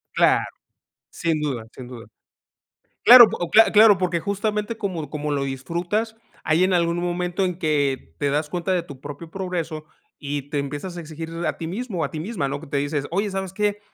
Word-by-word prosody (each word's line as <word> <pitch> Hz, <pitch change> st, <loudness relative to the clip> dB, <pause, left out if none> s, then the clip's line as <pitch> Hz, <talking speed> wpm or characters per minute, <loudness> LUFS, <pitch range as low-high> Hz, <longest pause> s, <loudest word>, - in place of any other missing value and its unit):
Claro, -, -, +4 dB, 0.7 s
sin 165 Hz, -2 st, -1 dB
duda, 130 Hz, -7 st, -3 dB
sin 125 Hz, -, -10 dB
duda. 120 Hz, -2 st, -10 dB, 1.0 s
Claro, 245 Hz, 0 st, +11 dB
o 175 Hz, -, -3 dB
p -, -, -24 dB
cla 225 Hz, +1 st, +7 dB
claro, 210 Hz, -1 st, +7 dB
porque 175 Hz, -1 st, 0 dB
justamente 210 Hz, +4 st, -2 dB
como 175 Hz, -9 st, -4 dB
como 150 Hz, 0 st, -3 dB
lo 140 Hz, -1 st, 0 dB
disfrutas, 175 Hz, -, -3 dB, 0.3 s
hay 160 Hz, +2 st, +2 dB
en 185 Hz, 0 st, +2 dB
algún 170 Hz, -1 st, +1 dB
momento 175 Hz, +2 st, -1 dB
en 180 Hz, -2 st, -3 dB
que 140 Hz, -, -1 dB
te 140 Hz, -, +1 dB
das 150 Hz, +2 st, -1 dB
cuenta 175 Hz, +3 st, -2 dB
de 180 Hz, -2 st, 0 dB
tu 140 Hz, -2 st, -11 dB
propio 145 Hz, +4 st, -9 dB
progreso, 170 Hz, -5 st, -4 dB, 0.3 s
y 145 Hz, -1 st, -4 dB
te 145 Hz, -, -1 dB
empiezas 145 Hz, +6 st, -5 dB
a -, -, -4 dB
exigir 160 Hz, 0 st, -8 dB, 0.2 s
a -, -, -2 dB
ti 160 Hz, -, -5 dB
mismo, 205 Hz, +1 st, -4 dB
o -, -, +1 dB
a -, -, -3 dB
ti 155 Hz, -, -5 dB
misma, 175 Hz, -4 st, -3 dB
¿no?, 140 Hz, +1 st, -3 dB
que 160 Hz, -, -12 dB
te 140 Hz, 0 st, -2 dB
dices: 145 Hz, 0 st, -2 dB
"Oye, 200 Hz, +3 st, -1 dB
¿sabes 190 Hz, -1 st, -4 dB
qué?, 210 Hz, +1 st, 0 dB
170 Hz, 205 wpm, -23 LUFS, 145-190 Hz, 1.0 s, Claro